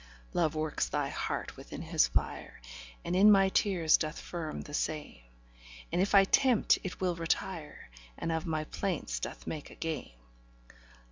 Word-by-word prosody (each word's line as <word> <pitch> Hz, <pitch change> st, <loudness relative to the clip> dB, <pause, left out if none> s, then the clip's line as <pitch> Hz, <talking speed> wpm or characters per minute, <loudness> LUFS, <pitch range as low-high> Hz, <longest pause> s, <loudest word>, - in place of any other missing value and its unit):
Love 160 Hz, -3 st, +1 dB
works 155 Hz, -, -1 dB
thy -, -, -1 dB
heart -, -, -3 dB
within -, -, -8 dB
his 60 Hz, -, +3 dB
fire, -, -, -3 dB, 0.5 s
And 175 Hz, -, -1 dB
in 205 Hz, +3 st, +8 dB
my 195 Hz, -1 st, +6 dB
tears 180 Hz, -5 st, +3 dB
doth 155 Hz, -1 st, -3 dB
firm 165 Hz, -3 st, -5 dB
the 150 Hz, -, -10 dB
same; 150 Hz, -, -3 dB, 0.7 s
And 175 Hz, +2 st, +2 dB
if 200 Hz, +2 st, +2 dB
I 195 Hz, -, +9 dB
tempt, 245 Hz, +3 st, +4 dB
it 185 Hz, -, -6 dB
will 185 Hz, -2 st, +1 dB
retire, 165 Hz, -, -3 dB, 0.3 s
And 165 Hz, -, -2 dB
of 160 Hz, 0 st, -2 dB
my 155 Hz, -1 st, -1 dB
plaints 155 Hz, -, -3 dB
doth -, -, -6 dB
make 155 Hz, -2 st, -5 dB
a -, -, -13 dB
game. 155 Hz, -, -5 dB
165 Hz, 160 wpm, -31 LUFS, 155-190 Hz, 0.7 s, I